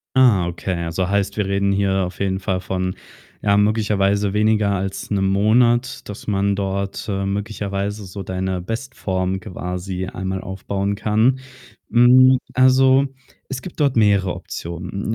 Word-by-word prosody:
Ah, 115 -9 +5
okay. 85 +2 -3
Also, 85 +2 -1
heißt, 100 0 0
wir 105 - +1
reden 100 0 +1
hier 100 0 +1
auf 90 - -8
jeden 95 -1 0
Fall 95 -1 -2
von, 95 0 -2 0.5
ja, 100 -1 +3
möglicherweise 105 -1 +1
weniger 105 -1 +2
als 95 +1 -3
'nem 95 -1 +1
Monat, 120 +6 +2
dass 105 - -8
man 100 -1 +1
dort, 100 0 -3
äh, 100 -2 -2
möglicherweise 100 0 -3
so 95 +1 -7
deine 95 0 -2
Bestform 95 -3 -3
quasi 90 -1 -5
einmal 95 0 -4
aufbauen 100 +1 -3
kann. 110 +6 +2 0.5
Hm, 130 +2 +6 0.2
also, 130 +1 +5 0.4
es 135 -1 -5
gibt 180 - -9
dort 140 -4 +2
mehrere 100 -4 +3
Optionen. 85 +6 -5
100 Hz, 145 wpm, -21 LUFS, 95-110 Hz, 0.5 s, Hm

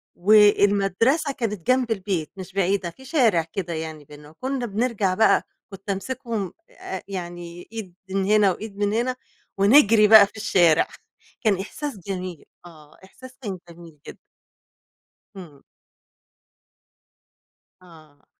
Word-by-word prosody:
والمدرسة 205 - +3
كانت 210 -9 -5
جنب 255 -2 +2
البيت 190 -6 -2
مش 190 0 -9
بعيدة، 195 -1 0
في 260 +10 -16
شارع 235 - +2
كده 170 +1 -5
يعني 160 -2 -6
بيننا، 150 +1 -14
وكنا 255 - -4
بنرجع 215 -3 -1
بقى 220 +4 +3 0.3
كنت 195 0 -12
امسكهم 225 -1 -4 0.2
آآ، 190 - -8
يعني 175 -2 -7
إيد 200 -6 -7 0.2
من 195 0 -1
هنا 210 -1 +4
وإيد 205 +2 -8
من 205 0 0
هنا، 245 +3 0 0.4
ونجري 210 0 +6
بقى 215 -2 +9
في 210 - -17
الشارع، 175 -6 +3 0.5
كان 205 -5 +1
إحساس 280 +6 -6
جميل، 180 -2 -6 0.2
آه، 155 -3 -16
إحساس 255 +6 -15
كان 200 -5 -5
جميل 170 -3 -14
جدًا. - - -10 1.2
همم. 155 -7 -12 2.2
آه. 155 -5 -19
195 Hz, 125 wpm, -23 LUFS, 175-220 Hz, 2.2 s, بقى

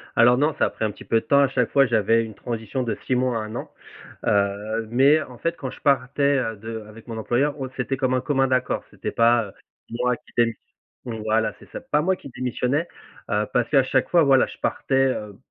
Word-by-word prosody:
Alors 120 +1 +6
non, 150 +3 +2
ça - - +4
a - - 0
pris 110 - -3
un 105 - -1
petit 105 - -14
peu 115 0 +2
de - - -24
temps. 140 - +4
À 140 - +5
chaque 125 -3 0
fois, 140 -1 +5
j'avais 115 0 +2
une 110 -2 -8
transition 115 +2 -4
de 115 - -2
6 130 - +2
mois 125 -1 +1
à - - -3
1 110 +1 -7
an. - - -6 0.5
Heu 105 +2 0
mais 140 +6 +5
en 125 -3 -12
fait 165 0 -1
quand 130 -2 -5
je - - -12
partais, 140 +1 +2
heu, 115 -3 -2
de 110 +2 -6
avec 110 +2 -14
mon 115 -1 -6
employeur, 135 +6 0
on 130 -1 -4
c'était 135 +1 -2
comme 130 -1 0
un 130 - +1
commun 135 -2 +1
accord. 130 -1 0
C'était - - -5
pas, 115 0 +3
heu, 95 - -13 0.4
moi 125 +1 0
qui - - -23
démiss 115 -1 +3 0.5
voilà, 110 -1 -1
c'est - - -17
ça. - - -7
Pas 150 - 0
moi 185 +4 +1
qui 140 - -12
démissionnais, 130 +5 -1 0.4
heu, 105 0 +1
parce 120 -2 +2
qu'à 135 -3 +4
chaque 130 0 0
fois, 170 -2 +5
voilà 135 -2 +5
je - - -11
partais, 135 - -1
heu, 105 -6 -4
125 Hz, 240 wpm, -23 LUFS, 115-135 Hz, 0.5 s, Alors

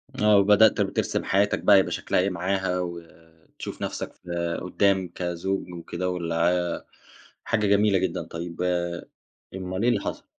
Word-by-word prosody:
آه، 105 -4 +4
وبدأت 105 +2 +5
بترسم 95 -1 -1
حياتك 100 +2 +2
بقى 105 - +6
هيبقى 95 - +3
شكلها - - 0
إيه 95 +2 +2
معاها، 95 0 -1
وتشوف 85 -2 -9
نفسك - - -4
في 85 -1 -4
قدّام 95 +1 +1
كزوج 90 +1 -3
وكده 85 +1 -4
والع 85 -1 0 0.9
حاجة 105 -3 0
جميلة 100 0 +4
جدًا، 90 -2 -2
طيّب 85 +1 -7 0.9
أُمال 95 +1 -4
إيه 120 - +4
اللي 110 -5 +1
حصل؟ - - -5
90 Hz, 140 wpm, -25 LUFS, 85-100 Hz, 0.9 s, بقى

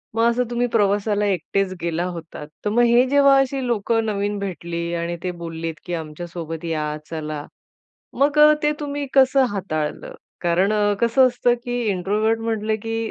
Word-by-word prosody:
मग 230 +1 +4
असं 240 +1 +1
तुम्ही 240 0 0
प्रवासाला 205 0 +2
एकटेच 195 0 0
गेला 170 0 -1
होतात. 165 -4 -7 0.2
तर - - +2
मग 230 +3 +3
हे 240 +1 +5
जेव्हा 280 0 +5
अशी 270 -1 0
लोकं 225 0 0
नवीन 205 -1 -1
भेटली 170 -3 -4
आणि 170 0 -3
ते 180 - -1
बोललेत 165 -1 -4
की 175 - -4
"आमच्यासोबत 165 0 -6
या, 155 -2 -2
चला." 155 -2 -5 0.8
मग 290 +2 +3
अ, 300 0 +8
ते 300 0 +3
तुम्ही 290 -1 -3
कसं 270 0 +5
हाताळलं? 155 -6 -3 0.3
कारण 180 +4 +2 0.3
कसं 235 +3 +5
असतं 245 -1 +2
की 245 -1 -2
इंट्रोव्हर्ट 210 +4 0
म्हटलं 220 -1 -1
की 225 0 -3
205 Hz, 160 wpm, -22 LUFS, 170-240 Hz, 0.8 s, अ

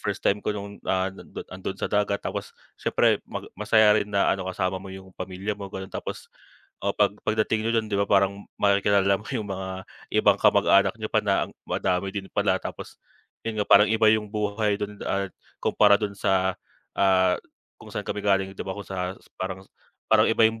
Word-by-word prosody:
first - - -4
time 100 +1 +2
ko 105 - -1
nung, 100 0 -8
ah, 95 0 +1
nandun, 95 - -9
nandun 95 +1 -5
sa - - -4
dagat 105 -1 +1
tapos - - -4 0.3
siyempre - - +2
mag - - -5
masaya 110 -1 +4
rin 105 - -4
na 100 -1 +2
ano 95 -1 -3
kasama 95 0 -2
mo 95 - -10
yung 95 0 -10
pamilya 95 +3 -4
mo 100 -1 -7
gano'n, 95 0 -7
Tapos, - - -6 0.6
oh, 100 - +1
pag 105 -1 +3
pagdating 110 0 0
niyo 115 - +1
do'n 110 - -9
di 100 - +1
ba, 100 - +3
parang 100 0 +2 0.2
makikilala 100 -1 +3
mo 105 - -13
yung 110 -5 -3
mga 95 -1 -5 0.3
ibang - - +4
kamag-anak - - +5
niyo - - -3
pa - - +2
ang - - +1
madami 95 +1 -1
din 100 -1 -5
pala. - - +2
Tapos - - -8 0.5
'yon 115 - -2
nga - - +1
parang 105 +1 +7
iba 110 0 +3
yung 110 -1 0
buhay 105 0 0
do'n 105 0 -5
at 100 0 -1 0.3
kumpara 105 -1 +5
dun 105 -1 -3
sa, 95 -1 +1 0.4
ah, 95 -2 +4 0.5
kung - - -12
saan - - -4
kami 105 - -3
galing 95 -1 +1
di - - -10
ba 95 0 -4
kung 100 -2 -8
sa 95 0 -4 0.2
parang, 95 0 -4 0.5
parang 110 0 +5
iba 115 0 +4
yung 110 0 -2
100 Hz, 200 wpm, -25 LUFS, 95-105 Hz, 0.6 s, parang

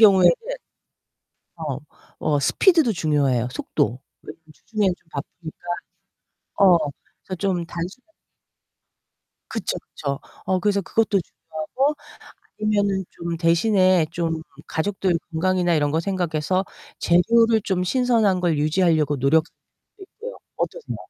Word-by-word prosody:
경우에는 190 -5 +7 1.2
어. 150 -5 -4 0.4
어 150 -2 +1
스피드도 315 - +4
중요해요 140 - +1
속도. 125 0 -1 0.2
왜냐면 165 - -11
주중에는 205 +2 -1
좀 165 - -34
바쁘니까. 160 +4 -8 0.9
어. 185 -3 +7 0.5
그래서 185 - -5
좀 185 -4 0
단순한 190 - -7 1.4
그쵸, 220 -5 -2
그쵸. 140 -2 -5 0.3
어 185 -1 +2
그래서 200 0 +2
그것도 215 +1 +1
중요하고 215 - -2 0.7
아니면은 205 -2 +1
좀 170 0 -4
대신에 185 0 +4
좀 165 -2 -2 0.3
가족들 185 +1 0
건강이나 175 +1 +2
이런 145 -2 +2
거 160 - +1
생각해서 185 0 -1 0.3
재료를 225 +5 +4
좀 185 -2 0
신선한 225 -3 +2
걸 170 -4 +1
유지하려고 155 -2 +2
노력하고 155 +5 +3 0.5
있고요. 445 +6 -9 0.2
어떠세요? - - -3
180 Hz, 280 characters per minute, -23 LUFS, 160-205 Hz, 1.4 s, 경우에는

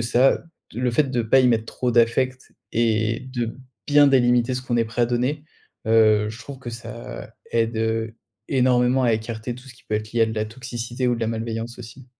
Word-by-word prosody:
ça, 120 +3 +3 0.3
d 115 - -5
le 125 -1 +1
fait 135 +3 +1
de 120 - +1
pas 115 +4 +4
y 130 - +4
mettre 115 -3 +2
trop 125 +1 -2
d'affect 125 +3 +1 0.2
et 115 -1 +1
de 120 -3 -3 0.3
bien 145 0 +6
délimiter 125 -2 +3
ce 125 - -3
qu'on 120 -2 -1
est 115 - +2
prêt 115 +2 -1
à - - +3
donner. 125 +5 -1 0.4
Heu, 110 -1 +4
je 110 +1 -8
trouve 140 0 -9
que 125 -2 -7
ça 115 +1 -8 0.2
aide, 115 0 +1
heu, 110 0 -1 0.3
énormément 125 0 +3
à 115 - +3
écarter 110 +2 -3
tout 125 +2 -13
ce 125 - -12
qui 120 - -22
peut 110 - -3
être 110 0 -3
lié 115 - +3
à - - +4
de 110 - -4
la 110 -1 -1
toxicité 120 +2 -5
ou 120 - +2
de 120 - -6
la 115 - 0
malveillance 115 +1 -4
aussi. 125 +2 -11
120 Hz, 220 wpm, -23 LUFS, 115-125 Hz, 0.4 s, bien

